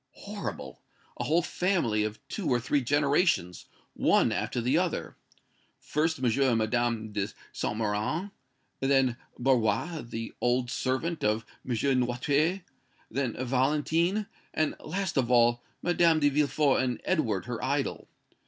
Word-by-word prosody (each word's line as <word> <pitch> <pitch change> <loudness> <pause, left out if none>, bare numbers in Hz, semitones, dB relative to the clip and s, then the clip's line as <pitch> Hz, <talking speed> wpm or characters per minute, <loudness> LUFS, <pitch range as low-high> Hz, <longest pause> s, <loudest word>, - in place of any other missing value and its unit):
"Horrible! - - -7 0.4
A - - -3
whole 165 +3 +2
family 170 - +1
of 110 0 -3
two 205 - -3
or 125 -2 +3
three 140 +4 +1
generations, 140 - +1 0.3
one - - +3
after - - -1
the 125 +4 +1
other! 180 0 -1 0.6
First 160 +2 0
M. 130 - -2
and 125 0 +3
Madame 115 -1 0
de 100 -1 -1 0.3
Saint 105 - -2
Méran 110 - -1 0.5
then 135 -2 +3 0.2
Barrois, 130 +6 +1
the 115 -1 -6
old 125 0 +1
servant 135 +8 -1
of 110 +1 +1 0.2
M. 125 - -3 0.3
Noirtier 145 +9 +1 0.5
then 125 -1 -1
Valentine, 155 - +1 0.3
and, 155 -1 +1
last 185 0 -3
of 125 -3 +2
all, 120 -1 +4 0.2
Madame 170 -2 +4
de 145 -1 +4
Villefort 145 -1 +2
and 125 -2 -1
Edward, 115 - 0
her 120 -2 -5
idol. 140 +1 -1
130 Hz, 135 wpm, -28 LUFS, 120-155 Hz, 0.6 s, all